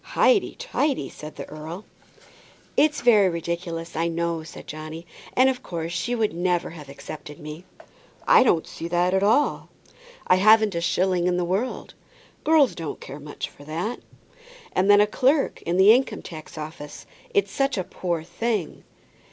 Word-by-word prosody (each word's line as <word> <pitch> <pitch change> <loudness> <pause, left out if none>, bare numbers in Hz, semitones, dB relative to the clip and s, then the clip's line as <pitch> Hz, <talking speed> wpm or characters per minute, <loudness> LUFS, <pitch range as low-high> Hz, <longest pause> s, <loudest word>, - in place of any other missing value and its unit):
"Highty 435 -6 +2
tighty," 310 - -1
said 150 0 -10
the - - -7
earl. 160 +6 -8 0.9
"It's 300 0 +3
very 210 -6 +5
ridiculous, 170 0 -4
I 165 +1 +1
know," 170 0 -1
said 155 - -11
Johnny, 155 +2 -8 0.3
"and 255 +1 +5
of 260 -1 0
course 165 -2 -5
she 175 +8 -1
would 220 -5 0
never 175 0 0
have 150 -4 -11
accepted 150 +2 -9
me." 155 +3 -9 0.6
"I - - +7
don't 175 -10 +3
see 165 - -7
that 175 +1 +1
at 190 - +2
all." 225 +9 +2 0.6
"I 180 - +4
haven't 215 +1 +5
a 170 - -2
shilling 180 0 +1
in 180 0 +1
the 180 - 0
world." 195 +9 -2 0.5
"Girls 310 -4 +4
don't 165 -3 -6
care 140 +2 -9
much 145 0 -6
for 145 - -16
that." 170 +10 -3 0.7
"And 190 +2 +2
then 205 0 +8
a - - +6
clerk 270 +7 +1
in 175 +1 +1
the 195 +3 +8
Income 240 -4 0
tax 155 -2 -10
Office! 150 -1 -8 0.3
It's 405 -3 +1
such 275 -3 0
a 185 - 0
poor 175 -2 -3
thing." 180 +2 -3
175 Hz, 170 wpm, -24 LUFS, 165-220 Hz, 0.9 s, then